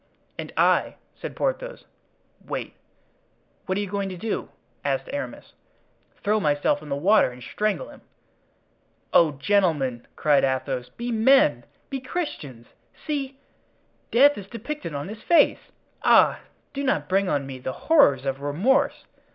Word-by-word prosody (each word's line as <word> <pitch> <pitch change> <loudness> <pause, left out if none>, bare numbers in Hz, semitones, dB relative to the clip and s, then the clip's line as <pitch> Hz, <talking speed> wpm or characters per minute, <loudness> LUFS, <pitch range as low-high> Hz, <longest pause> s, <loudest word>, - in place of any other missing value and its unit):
"And - - -5
I," - - +3 0.2
said - - -8
Porthos. - - -3 0.6
"Wait." - - -5 0.9
"What 185 +1 0
are - - 0
you 205 - -3
going 200 0 -2
to 185 - -7
do?" 220 +5 -3 0.3
asked - - -1
Aramis. - - -6 0.7
"Throw 210 +1 +2
myself 145 -3 +1
in 150 - -11
the 140 - -1
water 190 +4 +4
and 125 0 -12
strangle 215 - -2
him." - - -14 1.1
"Oh, 160 -3 +5
gentlemen!" 145 - 0
cried 150 -2 +3
Athos, 130 -1 -1
"be 240 +1 -5
men! 220 - +4 0.3
be 270 - -2
Christians! 200 - -5 0.4
See! 275 -3 -3 0.7
death 280 +1 +5
is 195 - -10
depicted 235 - -6
on 140 +3 -4
his 215 +2 -8
face! 340 - +3 0.3
Ah! - - +5 0.3
do 280 0 -3
not 275 - 0
bring 195 0 +1
on 140 -2 0
me 135 -1 -7
the 130 - -4
horrors 210 - +5
of 135 0 -2
remorse! 185 - +1
195 Hz, 145 wpm, -24 LUFS, -, 1.1 s, Oh